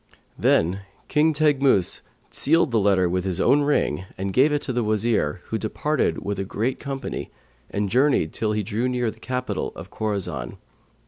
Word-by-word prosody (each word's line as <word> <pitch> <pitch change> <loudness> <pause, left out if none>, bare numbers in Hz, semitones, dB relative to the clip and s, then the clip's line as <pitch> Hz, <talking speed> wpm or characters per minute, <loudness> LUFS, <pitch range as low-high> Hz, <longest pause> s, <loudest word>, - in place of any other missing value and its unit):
Then 90 +4 +2 0.3
King 155 +2 +3
Teghmus 140 - +2 0.3
sealed 165 -1 +2
the 115 - +3
letter 95 -3 +3
with 90 +1 -1
his 95 -2 -2
own 145 - +4
ring 140 - +1
and 95 0 -3
gave 135 +7 +4
it 145 0 0
to 130 - -2
the 120 -1 0
Wazir, 105 -7 0
who 110 - -1
departed 120 - -1
with 100 -1 -2
a - - 0
great 115 +6 -2
company 135 -2 -5 0.4
and 100 0 -1
journeyed 125 - +2
till 105 -1 -1
he 105 0 -1
drew 115 +6 -1
near 125 -3 0
the 110 - -18
capital 125 +2 -3
of - - -10
Khorasan. 100 - -3
110 Hz, 175 wpm, -24 LUFS, 95-135 Hz, 0.4 s, own